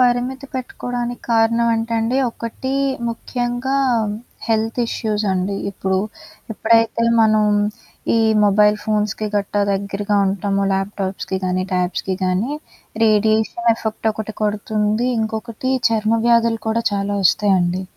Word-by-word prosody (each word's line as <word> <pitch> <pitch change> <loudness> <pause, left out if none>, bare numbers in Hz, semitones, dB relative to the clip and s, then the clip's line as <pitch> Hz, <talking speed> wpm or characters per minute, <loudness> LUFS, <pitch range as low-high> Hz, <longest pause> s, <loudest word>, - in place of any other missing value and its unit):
పరిమితి 250 +2 +1
పెట్టుకోవడానికి 245 -1 -4
కారణం 230 +1 +3
అంటే 225 +1 -2
అండి 230 +3 0
ఒకటి 235 +4 -5 0.4
ముఖ్యంగా 245 +3 -2 0.7
హెల్త్ 225 +1 0
ఇష్యూసండి. 200 -4 -1
ఇప్పుడు, 190 -1 -1 0.5
ఎప్పుడైతే 230 +1 +2 0.2
మనం 215 -1 +4 0.7
ఈ - - +4 0.3
మొబైల్ 210 +1 +4
ఫోన్స్‌కి 215 0 -1
గట్టా 205 0 0
దగ్గరగా 200 +1 -1
ఉంటామో 200 +1 0
ల్యాప్‌టాప్స్‌కి 195 -1 -2
గానీ, 185 0 0
ట్యాబ్స్‌కి 180 +1 -1
గానీ, 185 +9 0 0.5
రేడియేషన్ 220 +2 +2
ఎఫెక్ట్ 220 0 -2
ఒకటి 220 0 -6
కొడుతుంది. 210 +2 0
ఇంకొకటి 220 +3 -3 0.2
చర్మ 220 0 +1
వ్యాధులు 230 -1 +3
కూడా 230 +1 +1
చాలా 200 0 -1
వస్తాయండి 185 -1 +2
220 Hz, 105 wpm, -20 LUFS, 200-230 Hz, 0.7 s, మనం